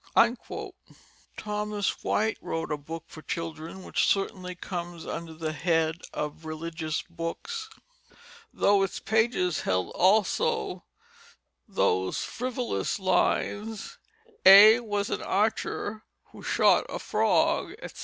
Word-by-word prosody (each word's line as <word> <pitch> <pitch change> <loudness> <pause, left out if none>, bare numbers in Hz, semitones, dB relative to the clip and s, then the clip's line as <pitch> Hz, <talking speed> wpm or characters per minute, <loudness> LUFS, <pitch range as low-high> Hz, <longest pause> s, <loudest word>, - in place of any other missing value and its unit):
Thomas 210 -1 -2
White 220 +1 0
wrote 165 -1 -3
a 150 - 0
book 160 +3 -7
for 155 - -12
children 165 +3 -5
which - - +1
certainly 185 -2 -1
comes 175 -2 -6
under 165 -1 -5
the 155 -1 -3
head 160 -1 +1
of 150 +2 -5
religious 160 0 -4
books, 435 - -5 0.8
though 200 -1 +3
its 195 -2 -1
pages 220 -6 +1
held 90 -1 -1
also 220 - +1 0.8
those 95 - 0
frivolous 250 0 -2
lines 205 +3 0 0.4
"A 205 +4 +10
was 205 -3 -2
an - - -2
archer 215 +1 -1 0.3
who - - -12
shot - - +3
at - - -5
a - - -1
frog," - - +1
etc. - - -10
185 Hz, 115 wpm, -27 LUFS, 165-215 Hz, 0.8 s, A